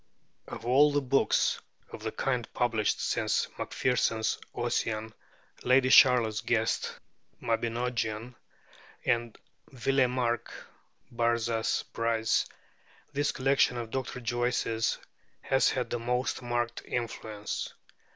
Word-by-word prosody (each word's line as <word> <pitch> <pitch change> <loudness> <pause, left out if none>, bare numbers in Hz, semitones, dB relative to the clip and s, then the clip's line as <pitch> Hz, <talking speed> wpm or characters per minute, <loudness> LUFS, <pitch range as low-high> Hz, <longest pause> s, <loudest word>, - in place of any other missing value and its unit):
Of 115 - -8
all 140 +5 +5
the 145 - +2
books 135 +1 +2 0.3
of - - -8
the 110 0 -3
kind 125 -2 -2
published 115 -4 +1
since - - 0
Macpherson's 115 -3 0 0.2
'Ossian,' 110 -2 -1 0.5
Lady 130 +1 +4
Charlotte 120 -5 +6
Guest's 115 -2 0 0.4
'Mabinogion,' 115 0 -2 0.7
and 120 -1 0 0.3
Villemarqué's 125 -2 0 0.6
'Barzaz 115 -1 0
Breiz,' 115 -1 +1 0.7
this 145 +1 +1
collection 130 -2 +2
of 115 -2 -5
Dr. 130 -1 -4
Joyce's 120 -1 0 0.4
has 135 - +3
had 125 -2 -2
the 120 - -1
most 125 +3 -1
marked 120 -1 -2
influence. 110 -3 -4
120 Hz, 100 wpm, -29 LUFS, 115-125 Hz, 0.7 s, Charlotte